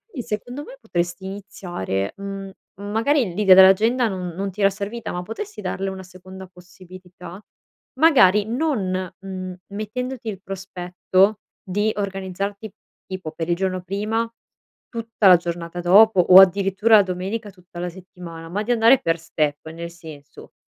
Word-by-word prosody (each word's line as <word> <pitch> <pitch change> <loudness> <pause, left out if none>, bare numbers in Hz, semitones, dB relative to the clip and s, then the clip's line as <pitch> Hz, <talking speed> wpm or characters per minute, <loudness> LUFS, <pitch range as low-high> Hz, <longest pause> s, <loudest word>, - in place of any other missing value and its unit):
i 255 - -3
secondo 245 +6 -5
me 270 - -12
potresti 175 -4 -3
iniziare, 175 - -5
mhmm 195 -1 -7 0.2
magari 220 - 0
l'idea 195 -2 +6
dell'agenda 215 +6 +5
non 185 -3 -4
non 195 +1 -3
ti 195 - -15
era 195 -1 +5
servita, 210 +4 -6
ma 180 - -4
potresti 395 - -7
darle 195 +1 -3
una 190 0 -7
seconda 185 +1 -12
possibilità? 180 0 -13 0.6
Magari 210 - +5
non, 215 - -2
mhmm, 185 -1 -6 0.2
mettendoti 240 +4 -5
il 195 -2 -7
prospetto 190 +1 0 0.2
di 205 +3 0
organizzarti, 200 +1 -4 0.4
tipo 185 -4 -6
per 165 +1 -5
il 170 - +2
giorno 185 0 -2
prima, 210 +5 -2 0.6
tutta 230 -3 0
la 180 -2 +9
giornata 170 0 -5
dopo 200 +3 +6
o 180 +1 +8
addirittura 195 +3 +4
la 205 - +5
domenica 195 +4 -4
tutta 180 -2 -17
la 180 - -3
settimana, 175 -2 -11
ma 205 +4 -2
di 235 - -2
andare 235 +2 +5
per 165 0 0
step. 155 -2 -2
Nel 170 +1 -7
senso: 155 -4 -13
190 Hz, 150 wpm, -22 LUFS, 180-210 Hz, 0.6 s, la